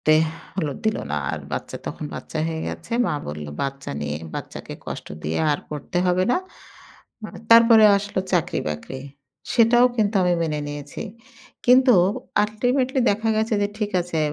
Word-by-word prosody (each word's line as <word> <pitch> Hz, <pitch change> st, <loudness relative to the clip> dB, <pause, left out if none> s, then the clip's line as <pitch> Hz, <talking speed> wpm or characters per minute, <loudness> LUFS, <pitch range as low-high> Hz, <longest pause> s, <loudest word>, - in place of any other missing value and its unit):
এতে, 155 Hz, -, +4 dB, 0.4 s
হলো 155 Hz, -7 st, -1 dB
দিল 220 Hz, -, +2 dB
না। 75 Hz, -, -1 dB, 0.2 s
আর -, -, -3 dB
বাচ্চা -, -, -4 dB
তখন -, -, -5 dB
বাচ্চা 160 Hz, -, -6 dB
হয়ে 160 Hz, -1 st, -3 dB
গেছে। -, -, -8 dB
মা 170 Hz, -, 0 dB
বলল 75 Hz, 0 st, -6 dB, 0.2 s
"বাচ্চা 135 Hz, 0 st, -4 dB
নিয়ে 75 Hz, 0 st, -3 dB, 0.2 s
বাচ্চাকে -, -, -7 dB
কষ্ট -, -, -6 dB, 0.2 s
দিয়ে 80 Hz, +2 st, -2 dB
আর 145 Hz, -, -1 dB
পড়তে 150 Hz, +4 st, -4 dB
হবে 180 Hz, +1 st, +2 dB
না।" -, -, +3 dB, 0.9 s
হু, 215 Hz, -, -4 dB, 0.2 s
তারপরে 230 Hz, -1 st, +8 dB
আসল 205 Hz, +1 st, -5 dB, 0.2 s
চাকরি 175 Hz, -4 st, +1 dB
বাকরি। 75 Hz, -, -6 dB, 0.6 s
সেটাও 240 Hz, +1 st, +6 dB
কিন্তু 215 Hz, -1 st, +1 dB
আমি 180 Hz, -1 st, +3 dB
মেনে 150 Hz, -2 st, -1 dB
নিয়েছি। 145 Hz, -1 st, -6 dB, 0.6 s
কিন্তু 255 Hz, +1 st, +6 dB, 0.5 s
ultimately 250 Hz, +5 st, 0 dB
দেখা 215 Hz, +2 st, -1 dB
গেছে 220 Hz, +1 st, +1 dB
যে 205 Hz, -, +1 dB
ঠিক 210 Hz, -2 st, -1 dB
আছে 175 Hz, -2 st, -3 dB
185 Hz, 160 wpm, -23 LUFS, 150-225 Hz, 0.9 s, তারপরে